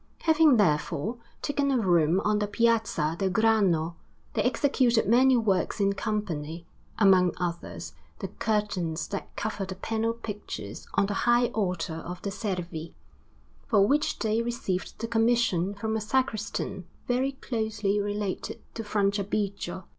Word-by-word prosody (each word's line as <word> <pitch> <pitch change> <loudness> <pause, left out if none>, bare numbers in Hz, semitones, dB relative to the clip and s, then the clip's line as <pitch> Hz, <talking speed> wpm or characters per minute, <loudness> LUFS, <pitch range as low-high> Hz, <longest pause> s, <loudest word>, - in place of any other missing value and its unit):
Having 315 -5 +5
therefore 170 +3 +1 0.3
taken 285 -1 0
a 270 - +3
room 175 -4 +3
on 210 0 +1
the 205 - 0
Piazza 220 -8 +1
del 195 - +1
Grano, 185 -6 +2 0.4
they - - +1
executed 250 -2 +2
many 255 +3 +5
works 210 -4 +1
in 200 0 +3
company; 175 -7 -3 0.3
among 190 -4 +5
others, 170 -1 -4 0.2
the - - -4
curtains 195 -7 -1
that 200 -2 -4
cover 210 -1 -3
the 190 0 -5
panel 225 +4 -1
pictures 205 - -7
on - - +4
the 205 - -2 0.2
high 240 0 +4
altar 180 -6 -2
of 180 +2 -6
the 200 - -2
Servi; 180 -6 -4 0.7
for 205 -5 +4
which 290 +7 +1
they 220 0 +1
received 230 -6 -3
the 230 - -4
commission 225 -5 +2
from 220 +2 -2
a 220 - -1
sacristan 210 -6 -2 0.2
very 260 +3 +1
closely 220 -5 -1
related 205 -1 -3
to 225 - -5
Franciabigio. 200 -2 -1
205 Hz, 140 wpm, -27 LUFS, 185-230 Hz, 0.7 s, Having